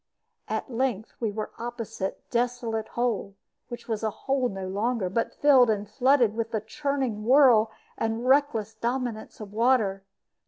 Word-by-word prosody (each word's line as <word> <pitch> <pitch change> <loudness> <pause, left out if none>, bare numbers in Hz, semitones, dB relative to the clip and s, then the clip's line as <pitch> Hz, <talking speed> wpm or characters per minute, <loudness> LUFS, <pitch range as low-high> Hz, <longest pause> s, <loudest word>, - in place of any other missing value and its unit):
At 265 - -3
length 235 -3 -1
we 225 - 0
were 210 +1 -4
opposite 230 -4 -5
"Desolate 235 -2 -1
Hole," 230 -5 -1 0.3
which 240 -1 -8
was 220 -3 -2
a 220 - 0
hole 265 +3 -1
no 195 -2 -5
longer, 205 0 -1
but 230 +3 -1
filled 265 -5 +5
and 210 -1 0
flooded 245 0 +3
with 225 0 -2
the 220 -2 -2
churning 265 -2 -2
whirl 245 -3 +6 0.3
and 225 +2 -1
reckless 260 -6 +2
dominance 235 0 -3
of 210 -2 -9
water. 220 -4 +2
230 Hz, 150 wpm, -26 LUFS, 215-250 Hz, 0.3 s, whirl